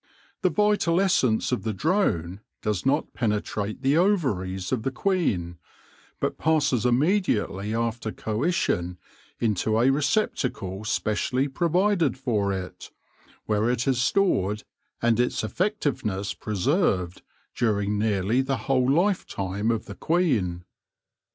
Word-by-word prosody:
The - - +3
vital 210 -5 +2
essence 135 - +2
of 125 - 0
the 110 -1 -2
drone 95 - 0 0.2
does 105 +2 -1
not 145 +3 +1
penetrate 105 0 -2
the 140 +3 +3
ovaries 115 - 0
of 130 -4 0
the 135 - -1
queen, 120 - -1 0.6
but - - -2
passes 145 -7 +2
immediately 120 - +1
after 115 -1 -2
coition 105 - -1 0.4
into 110 0 +1
a 125 +3 +4
receptacle 125 - -1
specially 125 +6 0
provided 170 - +1
for 110 -7 0
it, 95 -1 -6 0.6
where 105 +2 +1
it 125 +2 -1
is 130 -2 +2
stored, 110 - +1 0.4
and 120 -1 +3
its 125 -2 +1
effective 175 - -1
ness 100 -1 -2
preserved, 105 - 0 0.3
during 105 -3 0
nearly 105 +3 +1
the 135 0 -1
whole 130 -1 +2
lifetime 115 - 0
of 115 -2 -1
the 100 - -8
queen. 110 - 0
120 Hz, 120 wpm, -25 LUFS, 105-150 Hz, 0.6 s, a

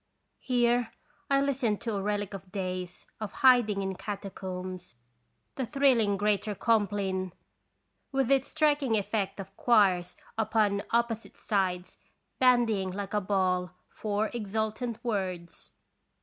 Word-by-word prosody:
Here 240 -2 +1 0.4
I 275 0 +4
listened 255 -7 0
to 230 - -2
a 200 - -1
relic 205 0 -2
of 190 -1 -9
days 185 -2 -4
of 215 -2 -4
hiding 225 -6 +5
in 190 0 -2
catacombs, 185 - -6 0.6
the 265 - -1
thrilling 245 -8 +3
Greater 210 +1 0
Compline, 195 -4 0 0.8
with 270 -2 +1
its 270 -1 +3
striking 290 -7 +2
effect 200 -1 -2
of 195 0 -8
choirs 190 -6 +3 0.2
upon 215 -2 +2
opposite 235 -1 -1
sides 185 -3 -1 0.4
bandying 235 -7 +3
like 195 +1 -5
a 210 - +2
ball 185 -2 0 0.2
four 215 0 -1
exultant 220 +1 -2
words. 185 -7 -3
205 Hz, 120 wpm, -29 LUFS, 190-235 Hz, 0.8 s, hiding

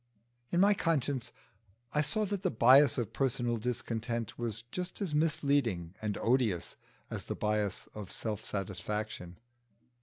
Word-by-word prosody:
In 175 - +1
my 200 +2 +6
conscience 145 - 0 0.6
I 150 - +3
saw 215 +9 0
that 200 -1 -2
the - - +1
bias 130 +4 +6
of 120 -5 -2
personal 120 -3 0
discontent 115 -1 -2
was 115 -1 -3
just 180 0 -4
as 190 -7 -2
misleading 140 - +1
and 105 -2 -1
odious 115 -8 +1 0.4
as - - -4
the - - -3
bias 105 -2 0
of 105 -3 -7
self 110 -2 -3
satisfaction. 95 -2 -4
120 Hz, 140 wpm, -32 LUFS, 105-145 Hz, 0.6 s, my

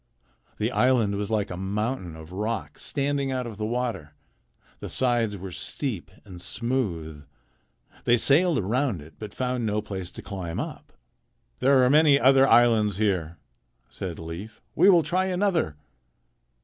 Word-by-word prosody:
The 110 +3 -1
island 120 -7 +2
was 100 +1 -3
like 105 -3 -1
a - - -4
mountain 95 -1 -3
of 80 +1 -11
rock 105 -4 -4
standing 140 -1 -1
out 130 -1 -2
of 115 -4 -7
the 105 - -1
water. 115 -11 -3 0.6
The - - -7
sides 120 -5 0
were 95 0 -7
steep 110 - -3 0.2
and 90 -4 -11
smooth. 85 - -3 0.8
They 120 - +5
sailed 160 +8 +3
around 110 - -1
it, 80 - -15
but 105 -2 -7
found 125 0 -2
no 105 -1 0
place 95 -4 -5
to - - -9
climb 90 -5 -5
up. - - -6 0.7
"There 135 0 +4
are 125 - +4
many 150 -2 +6
other 135 0 +5
islands 110 -6 +4
here," 90 -6 0 0.5
said 90 -4 -6
Leif. 85 +7 -8
"We 185 +5 +5
will 175 -4 +6
try 180 +5 0
another." 180 - 0
110 Hz, 150 wpm, -26 LUFS, 95-130 Hz, 0.8 s, many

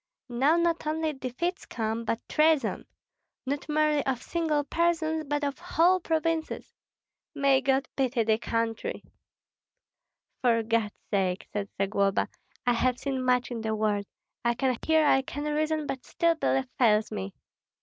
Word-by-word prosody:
Now 265 +6 +3
not 340 -2 +1
only 315 0 0
defeats 285 +8 -3
come, 225 0 -2
but 230 - -3
treason, 305 -6 +2 0.6
not 280 +3 -3
merely 300 -1 +2
of 260 -3 0
single 315 -4 0
persons, 320 0 0
but 290 +1 -1
of 280 -1 -2
whole 355 +1 +3
provinces. 325 -1 -2 0.6
May 275 -2 +3
God 270 +1 +1
pity 255 -3 +1
the 220 0 +2
country!" 230 -1 -2 1.4
"For 230 -2 +3
God's 225 -2 0 0.2
sake," 190 -2 0
said 205 -1 -2
Zagloba, 195 0 +1 0.4
"I 245 - +4
have 250 +1 +1
seen 265 -2 -2
much 250 -1 +2
in 235 -2 -3
the 220 0 -1
world. 210 -2 0 0.4
I 235 0 +2
can 260 0 +1
hear, 315 -1 +4
I 270 -2 +5
can 290 +2 -6
reason, 305 +1 0
but 260 -3 -4
still 335 0 +1
belief 270 -4 0
fails 215 -3 +4
me." 95 0 -5
270 Hz, 150 wpm, -28 LUFS, 230-310 Hz, 1.4 s, I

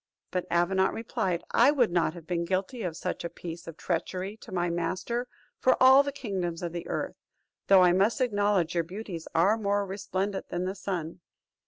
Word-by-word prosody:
But 180 -1 -2
Avenant 190 +2 +2
replied, 190 -6 -2
"I 240 +4 +6
would 255 -9 +3
not 170 -1 +1
have 170 -2 -10
been 170 0 -1
guilty 190 +7 -2
of 175 -5 -3
such - - -3
a 170 - -3
piece 170 0 -8
of 165 -1 -8
treachery 185 +3 -3
to - - -13
my 175 -1 0
master 185 +8 -2 0.3
for 255 - +4
all 265 +1 +8
the 280 0 -2
kingdoms 190 -11 -3
of 170 - -2
the 170 - -5
earth; - - -3 0.5
though 190 -2 +7
I 180 - +6
must 200 +8 +2
acknowledge 205 -7 +1
your 170 -1 +1
beauties 180 -1 -7
are 200 +7 +4
more 205 -1 +1
resplendent 195 0 -3
than 175 +1 -2
the 190 - -2
sun." 180 -4 -4
185 Hz, 190 wpm, -28 LUFS, 175-205 Hz, 0.5 s, all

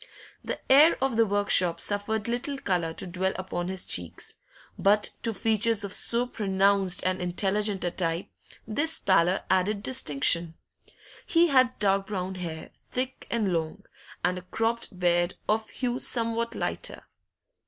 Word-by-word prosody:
The - - -4
air 295 +5 +6
of 265 -2 0
the 225 0 +3
workshop 195 -4 +3
suffered 205 +1 -1
little 245 +4 -2
colour 180 -9 -1
to - - -3
dwell 185 +1 -1
upon 180 -2 -4
his 190 -1 -2
cheeks; 90 -2 -2 0.4
but 205 +1 +3
to 230 - +1
features 225 +1 +2
of 200 -1 -3
so 235 +1 +1
pronounced 195 -5 +1
and 185 0 0
intelligent 195 +3 -1
a 175 - -1
type 170 0 -2 0.4
this 295 +9 0
pallor 185 -1 +2
added 190 +3 +2
a - - -10
distinction. 170 - 0 0.7
He 340 0 +4
had 255 -3 +3
dark 195 -1 +1
brown 190 -2 -3
hair, 170 -4 -6 0.2
thick 255 +1 -4
and 215 -6 0
long, 165 +4 -3 0.4
and 180 0 0
a - - -12
cropped 225 +2 -2
beard 175 0 +1
of 220 +1 0
hue 250 -1 -3
somewhat 230 0 0
lighter. - - -4
200 Hz, 150 wpm, -27 LUFS, 180-230 Hz, 0.7 s, air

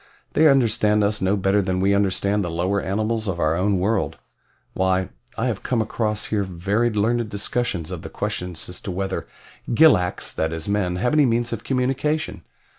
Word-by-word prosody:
"They 160 - +5
understand 110 -6 +3
us 105 +1 0
no 95 +2 +2
better 95 +1 +2
than 95 -1 -1
we 100 +1 +3
understand 100 +1 +1
the 90 - -3
lower 90 +4 0
animals 110 +3 -1
of 90 -3 -2
our 80 -1 +2
own 95 +3 +1
world. 100 +3 0 0.6
Why, 95 0 +1 0.3
I 115 - 0
have 115 -6 -1
come 125 - 0
across 110 0 -1
here 105 -2 +2
very 100 +6 0
learned 115 +1 0
discussions 100 -5 -2
of - - -5
the - - -8
question 90 0 -3
as 90 +2 -6
to - - -6
whether 95 +1 -3 0.5
gilaks, 90 - +4
that 80 +1 -1
is 80 +2 -5
men, 100 -3 0
have 125 +9 0
any 150 -3 +5
means 120 0 0
of 115 - -5
communication. 135 +4 -1
100 Hz, 185 wpm, -23 LUFS, 95-115 Hz, 0.6 s, They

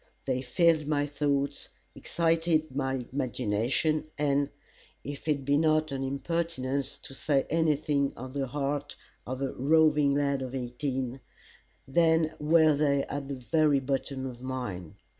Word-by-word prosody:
They 130 -1 0
filled 155 +4 +2
my 145 -1 +1
thoughts, 140 -1 -1 0.2
excited 165 -3 0
my 135 -2 -1
imagination, 130 +4 0
and, 140 -1 +1 0.5
if 145 +2 -7
it 145 -3 0
be 145 +1 +3
not 155 -1 +2
an 135 -1 -2
impertinence 140 -1 -2
to - - -9
say 135 0 +1
any 160 -1 +3
thing 140 -2 0
of 130 +1 -7
the 140 -1 -1
heart 145 +2 -3 0.3
of 130 +2 -3
a 135 - -2
roving 150 0 +3
lad 140 -1 +1
of 130 0 -5
eighteen, 130 0 -3 0.7
then 160 +2 +3
were 155 +1 +5
they 140 -1 +2
at 140 -1 -5
the 140 - -4
very 145 +3 +2
bottom 135 0 -2
of 125 -2 -7
mine. 125 -11 -5
140 Hz, 140 wpm, -29 LUFS, 130-155 Hz, 0.7 s, were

